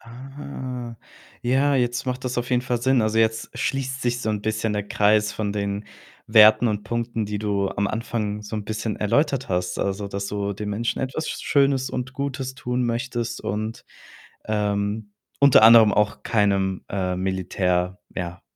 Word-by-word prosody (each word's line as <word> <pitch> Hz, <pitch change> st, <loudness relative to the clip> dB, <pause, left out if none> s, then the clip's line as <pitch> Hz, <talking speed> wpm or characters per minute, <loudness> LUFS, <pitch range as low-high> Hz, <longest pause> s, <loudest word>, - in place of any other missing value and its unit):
Ah. 125 Hz, -1 st, -8 dB, 0.5 s
Ja, 135 Hz, +4 st, +2 dB
jetzt 125 Hz, +1 st, 0 dB
macht 125 Hz, 0 st, -3 dB
das 125 Hz, 0 st, -2 dB
auf 120 Hz, +1 st, -3 dB
jeden 125 Hz, -1 st, +2 dB
Fall 125 Hz, -1 st, -1 dB
Sinn. 130 Hz, +1 st, +3 dB
Also, 110 Hz, +1 st, +1 dB
jetzt 110 Hz, 0 st, +1 dB
schließt 135 Hz, 0 st, -2 dB
sich 120 Hz, 0 st, 0 dB
so 110 Hz, -, -3 dB
'n 105 Hz, -1 st, -2 dB
bisschen 110 Hz, 0 st, -1 dB
der 105 Hz, -1 st, -2 dB
Kreis 105 Hz, +1 st, +2 dB
von 105 Hz, -2 st, -2 dB
den 100 Hz, 0 st, -2 dB, 0.4 s
Werten 110 Hz, +1 st, +7 dB
und 105 Hz, -1 st, -2 dB
Punkten, 115 Hz, 0 st, -2 dB
die 105 Hz, 0 st, -3 dB
du 100 Hz, -2 st, 0 dB
am 100 Hz, +1 st, -1 dB
Anfang 105 Hz, -1 st, -3 dB
so 105 Hz, +1 st, -7 dB
'n 105 Hz, -, -4 dB
bisschen 110 Hz, 0 st, -3 dB
erläutert 135 Hz, +5 st, +1 dB
hast. 90 Hz, 0 st, -1 dB
Also, 100 Hz, +1 st, -2 dB
dass 100 Hz, 0 st, -4 dB
du 100 Hz, 0 st, -2 dB
den 105 Hz, +1 st, -5 dB
Menschen 115 Hz, +3 st, -2 dB
etwas 135 Hz, +4 st, -3 dB
Sch -, -, -5 dB
Schönes 135 Hz, -2 st, +3 dB
und 125 Hz, +1 st, -4 dB
Gutes 135 Hz, -1 st, -4 dB
tun 125 Hz, -1 st, -2 dB
möchtest 120 Hz, -1 st, -2 dB
und, 110 Hz, +2 st, -4 dB, 0.6 s
ähm, 105 Hz, 0 st, -1 dB, 0.3 s
unter 140 Hz, -6 st, +7 dB
anderem 110 Hz, -1 st, +8 dB
auch 105 Hz, 0 st, +1 dB
keinem, 100 Hz, -3 st, +1 dB
äh, 95 Hz, -2 st, -1 dB
Militär, 90 Hz, 0 st, -1 dB, 0.2 s
ja, 90 Hz, -1 st, -5 dB
110 Hz, 170 wpm, -23 LUFS, 100-125 Hz, 0.6 s, anderem